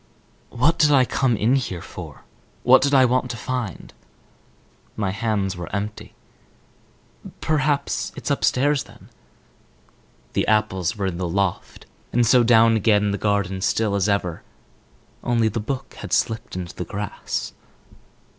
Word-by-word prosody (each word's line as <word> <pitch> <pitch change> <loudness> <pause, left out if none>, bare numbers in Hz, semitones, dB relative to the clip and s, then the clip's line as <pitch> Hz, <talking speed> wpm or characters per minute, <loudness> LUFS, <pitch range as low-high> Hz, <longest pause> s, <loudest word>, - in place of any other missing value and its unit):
"What 145 +8 +1
did 150 - +5
I 135 -3 +5
come 120 -2 +1
in 115 +6 +2
here 120 -10 -1
for? - - -10 0.4
What 130 +2 +6
did 140 - +1
I 135 -2 +6
want 125 +1 +1
to 115 - -5
find?" 125 -2 -5 1.0
My 100 -3 -1
hands 100 -2 -1
were 85 -1 -7
empty. 105 +1 -5 1.2
"Perhaps 150 -2 0
it's - - -4
upstairs 140 +2 +1
then?" - - -17 1.2
The - - 0
apples 105 -3 +1
were 100 - -2
in 90 -3 -2
the 90 -2 -2
loft. 95 0 -2 0.3
And 120 0 +3
so 125 +2 +5
down 115 -1 +5
again, 105 -1 +2
the 100 - -2
garden 100 -2 0
still 105 +1 +1
as 100 0 +1
ever, 90 -4 -1 0.8
only 115 -2 +2
the 110 - -3
book 125 +5 -5
had - - -6
slipped 110 -4 -1
into 90 -1 -5
the - - -5
grass. 100 +3 -4
110 Hz, 145 wpm, -22 LUFS, 100-125 Hz, 1.2 s, What